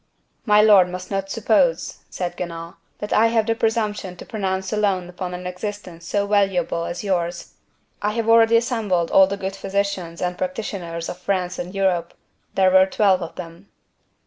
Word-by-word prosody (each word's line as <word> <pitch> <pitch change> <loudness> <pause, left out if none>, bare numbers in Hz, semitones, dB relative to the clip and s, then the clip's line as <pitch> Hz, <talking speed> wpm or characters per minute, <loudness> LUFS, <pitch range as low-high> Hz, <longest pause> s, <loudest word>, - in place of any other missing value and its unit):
"My 210 0 +6
lord 200 -4 +6
must 180 +2 -7
not 195 0 -2
suppose," - - +1
said 180 -1 -4
Guenaud, 170 -1 -6 0.2
"that 210 - -4
I 225 +2 +5
have 225 -1 +1
the 225 - +1
presumption 220 -5 -1
to - - -11
pronounce 190 -2 -3
alone 200 -4 0
upon 180 0 -5
an 180 0 -8
existence 180 -2 -6
so 200 0 0
valuable 195 -5 +1
as 175 +3 -5
yours. 175 -3 -2 0.5
I 210 +1 0
have 230 0 -2
already 230 0 +6
assembled 215 -8 0
all 190 -1 +7
the 200 +1 -3
good 195 0 -4
physicians 195 -3 -2
and 180 0 -2
practitioners 180 -3 -4
of 180 - -6
France 180 -1 -2
and 180 +3 -6
Europe. 180 -3 0 0.4
There 190 -1 +4
were 190 0 +6
twelve 190 -1 +2
of 170 - -6
them." 170 +2 -10
190 Hz, 170 wpm, -22 LUFS, 180-210 Hz, 0.5 s, all